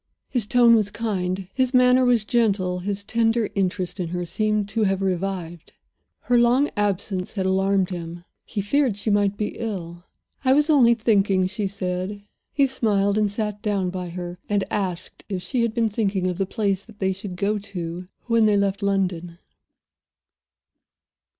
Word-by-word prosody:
His 235 -6 -1
tone 240 0 +5
was 215 -3 +3
kind; 195 -4 -3
his 260 +1 +1
manner 250 0 +5
was 240 -4 +3
gentle; 200 -6 +1
his 200 +2 -3
tender 225 0 +1
interest 185 -1 -2
in 175 - -1
her 175 +1 -3
seemed 215 +3 0
to 225 +1 -1
have 195 -2 +2
revived. 185 -3 -3 0.5
Her 245 -1 +3
long 245 +5 +3
absence 200 -2 -1
had 190 -3 -2
alarmed 190 0 +1
him; 170 -1 -6 0.2
he 210 - -4
feared 245 +1 +1
she 210 +1 -2
might 205 0 +2
be 210 - -3
ill. 175 -6 -5 0.4
"I 260 0 +4
was 295 +3 +3
only 240 -5 +6
thinking," 200 -4 +2
she 195 +2 -2
said. 190 +1 -4 0.3
He 280 - +3
smiled, 205 -6 +1
and 210 -1 +2
sat 210 0 -3
down 195 -4 -1
by 180 -1 -5
her, 175 0 -6
and 205 -1 +1
asked 185 -3 -3
if 185 -3 -3
she 255 -3 -1
had 230 -1 0
been 230 -2 +2
thinking 200 -3 -1
of 180 0 -2
the 195 - 0
place 200 -3 -1
that 220 -2 -15
they 190 -1 0
should 190 -1 -7
go 205 +3 0
to 180 -3 -6 0.2
when 230 -2 +3
they 205 -1 +3
left 200 0 0
London. 180 -4 -1
200 Hz, 170 wpm, -23 LUFS, 185-220 Hz, 0.5 s, only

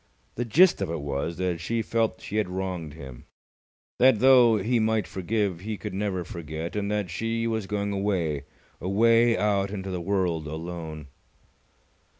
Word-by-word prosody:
The 120 - -3
gist 170 - +5
of - - -1
it 85 -1 -3
was 70 +3 -3
that 90 -2 -1
she 115 +6 -1
felt 115 +1 0
she 105 - -4
had 105 -4 0
wronged 90 -5 -4
him; 65 -5 -10 0.7
that, 130 -2 +6
though 125 -2 +6
he 115 +5 +1
might 110 -2 +1
forgive, 95 -1 -2
he 105 +3 -5
could 105 -1 -6
never 95 -2 -2
forget; 80 0 -6
and 100 -1 -1
that 105 -4 -1
she 115 +3 -2
was 110 -3 -2
going 100 0 -2
away, 90 -8 -1 0.4
away 115 +5 +4
out 100 -2 +1
into 95 -1 -5
the 90 -1 -3
world 85 -4 0
alone. 80 -2 -6
100 Hz, 160 wpm, -26 LUFS, 85-110 Hz, 0.7 s, that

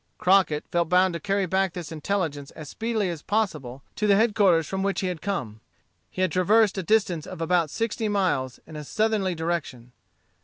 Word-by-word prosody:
Crockett 180 -5 +3
felt 170 -2 +1
bound 180 0 +4
to 170 - -4
carry 200 0 0
back 190 0 0
this 175 -3 -7
intelligence 155 -4 -3
as 150 -2 -9
speedily 220 -5 -2
as 165 -3 -7
possible 150 - -2
to 210 - 0
the 200 - +5
headquarters 200 -6 +3
from 190 +5 -3
which 195 0 -1
he 190 - -1
had 175 -4 -5
come. 130 - -4 0.5
He 185 - -2
had 185 - +1
traversed 205 +2 +3
a - - -1
distance 185 -5 +1
of - - -8
about 165 -1 +1
sixty 225 +3 -2
miles 175 -11 0
in 155 - -12
a 150 - -6
southerly 210 0 0
direction. 160 -7 -4
185 Hz, 190 wpm, -25 LUFS, 160-200 Hz, 0.5 s, the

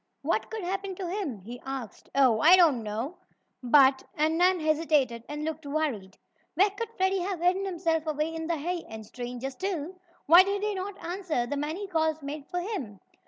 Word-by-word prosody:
"What - - 0
could 445 -3 -5
happen 385 +1 -3
to 370 -1 -5
him?" 340 - -3
he 240 +5 -9
asked. 265 -5 -7
"Oh, 255 -5 +4
I 335 +9 +8
don't 320 -10 +4
know, 225 +11 -4 0.4
but 265 +1 +5
" - - -40
and 310 +2 +2
Nan 360 +2 +4
hesitated 305 -7 +1
and 295 +1 -4
looked 320 0 -4
worried. 280 -10 -3 0.4
Where 390 +5 +4
could 440 +3 -5
Freddie 380 0 +2
have 370 0 -3
hidden 370 +3 +2
himself 330 -4 -1
away 305 +1 -1
in 325 0 -4
the 335 -1 0
hay, 345 +3 -3
and 220 -1 -8
stranger, 245 +3 -6
still, 350 +2 -4 0.3
why 340 +4 +9
did 395 +1 -1
he 425 0 0
not 385 +1 -5
answer 345 -8 -2
the 285 - -3
many 310 +8 -3
calls 320 -4 0
made 285 +1 -6
for 355 - -2
him? 295 - -5
315 Hz, 195 wpm, -28 LUFS, 270-370 Hz, 0.4 s, why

